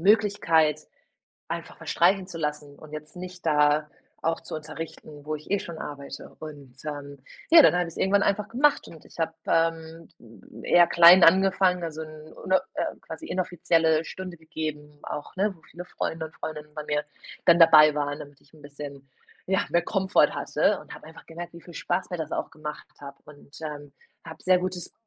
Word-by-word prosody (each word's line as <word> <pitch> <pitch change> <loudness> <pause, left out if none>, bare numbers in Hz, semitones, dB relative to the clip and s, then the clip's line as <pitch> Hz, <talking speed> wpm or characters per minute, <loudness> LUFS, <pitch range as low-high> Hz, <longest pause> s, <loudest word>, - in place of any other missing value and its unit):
Möglichkeit 165 -7 +3 0.7
einfach - - -6
verstreichen 185 +2 +2
zu 175 -3 -7
lassen 150 -1 -4
und 155 - -14
jetzt 150 +2 -8
nicht 180 0 -9
da 150 0 +3 0.3
auch 165 0 -1
zu - - -10
unterrichten, 155 -1 -9
wo 155 0 -2
ich 150 - -12
eh 200 - +2
schon 170 -1 -8
arbeite. 140 -2 -8
Und, 145 -5 -10
ähm, 145 -2 -6 0.3
ja, 330 - +10
dann 275 - +6
habe 180 - +2
ich - - -7
es - - -13
irgendwann 200 +1 +2
einfach 210 +1 0
gemacht 280 +5 +2
und 160 - -14
ich - - -17
hab, 160 0 -1
ähm, 165 0 -1 0.5
eher 175 -1 +5
klein 170 +2 +8
angefangen, 185 0 +4
also 160 -1 -6
'n 155 0 -12
ne, 190 0 +4
äh, - - 0 0.2
quasi 320 - -9
inoffizielle 165 -3 +1
Stunde 185 0 -7
gegeben 150 -2 -6
auch, 145 - -7
ne, 200 0 0
wo 165 - -24
viele 175 +2 -10
Freunde 160 -2 -4
und 160 - -13
Freundinnen 150 -1 -7
bei 150 - -5
mir 150 0 -1 0.4
dann 170 0 +6
dabei 155 -2 +8
waren, 145 0 -2
damit 145 -1 -12
ich 145 - -27
'n 155 - -18
bisschen, 140 -1 -10 0.4
ja, 190 +1 +1
mehr 170 0 +2
Komfort 190 +1 +2
hatte, - - +1
und - - -12
habe - - -12
einfach 160 - -14
gemerkt, 170 +1 -9
wie 170 - -12
viel 175 - -14
Spaß 190 - -2
mir 180 - -4
das 160 -2 -5
auch - - -3
gemacht 150 -1 -8
habe 140 -1 -10
und, 145 -1 -15
ähm, 145 -2 -7 0.3
habe 160 -1 -11
sehr 185 -1 +4
gutes 180 -1 -4
160 Hz, 190 wpm, -26 LUFS, 150-180 Hz, 0.7 s, ja